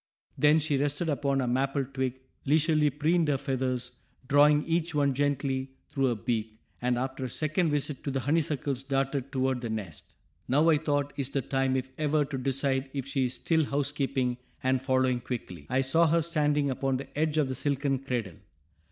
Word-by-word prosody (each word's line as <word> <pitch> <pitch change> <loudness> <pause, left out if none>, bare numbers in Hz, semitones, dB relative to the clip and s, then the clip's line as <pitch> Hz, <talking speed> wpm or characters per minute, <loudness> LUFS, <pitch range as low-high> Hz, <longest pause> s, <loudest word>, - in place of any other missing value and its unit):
Then 150 +1 +5
she 150 -3 +1
rested 145 +4 0
upon 140 -2 +1
a 125 - -1
maple 135 +2 0
twig, 130 -1 -3 0.2
leisurely 155 +1 +3
preened 160 +3 +1
her 145 -2 +2
feathers, 130 -2 -2 0.3
drawing 150 +2 +5
each 165 -1 0
one 140 -2 +2
gently 135 -1 -1 0.2
through 135 -1 +1
her 120 - +1
beak, 110 0 -3 0.2
and 125 0 +1
after 130 +1 -3
a - - -4
second 155 +5 0
visit 145 -1 -2
to - - -1
the 135 -1 -1
honeysuckles 145 -1 0
darted 135 0 -1
toward 130 -2 0
the 120 - -4
nest. 100 -9 -6 0.3
Now, 145 +5 +3
I 150 - +3
thought, 145 -2 -1
is 140 -2 -2
the 135 -1 -1
time, 135 -1 0
if 130 0 -1
ever, 150 -1 +2
to 140 -1 -4
decide 135 0 0
if 135 -3 -3
she 135 -2 0
is 125 - -5
still 160 -1 +1
housekeeping, 140 -3 -1 0.3
and 130 -1 +2
following 130 -2 +1
quickly, 90 - -6
I 130 - +2
saw 160 +6 +3
her 165 +1 +3
standing 150 -3 +1
upon 135 0 0
the 135 +1 -9
edge 155 +1 0
of 150 -3 +3
the 130 - -3
silken 140 0 0
cradle. 120 -9 -3
135 Hz, 185 wpm, -28 LUFS, 130-150 Hz, 0.3 s, Then